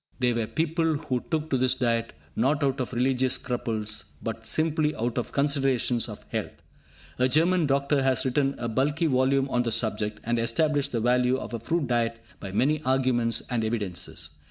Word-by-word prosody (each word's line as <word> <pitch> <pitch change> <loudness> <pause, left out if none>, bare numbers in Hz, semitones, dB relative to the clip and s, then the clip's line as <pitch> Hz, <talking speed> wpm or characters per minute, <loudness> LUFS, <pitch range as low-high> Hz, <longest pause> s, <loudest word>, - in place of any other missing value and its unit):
They 125 -2 +2
were 115 -2 -1
people 165 +1 0
who 145 -4 -2
took 160 -1 -1
to 130 - +2
this 130 0 +3
diet, 115 -2 0 0.2
not 140 +6 +1
out 135 0 +1
of 130 - -2
religious 130 +1 +1
scruples, 115 -4 -3 0.2
but - - -5
simply 155 -1 +1
out 120 +2 -1
of 120 - -5
considerations 135 -4 +1
of 105 - -9
health. - - -4 0.6
A 125 - +4
German 165 +4 +3
doctor 140 +1 +2
has 130 -2 +1
written 135 +1 +1
a 120 - -3
bulky 145 +8 +1
volume 135 -1 +2
on 120 - +2
the 120 -1 -1
subject, 105 -1 0
and 120 0 0
established 140 +5 +1
the 115 - -1
value 125 +2 +3
of 130 - -7
a 115 - -2
fruit 160 +7 -1
diet 115 -2 0 0.2
by 95 - -6
many 145 +9 +1
arguments 130 -3 +1
and 120 -2 0
evidences. 105 -10 -3
130 Hz, 180 wpm, -26 LUFS, 115-140 Hz, 0.6 s, A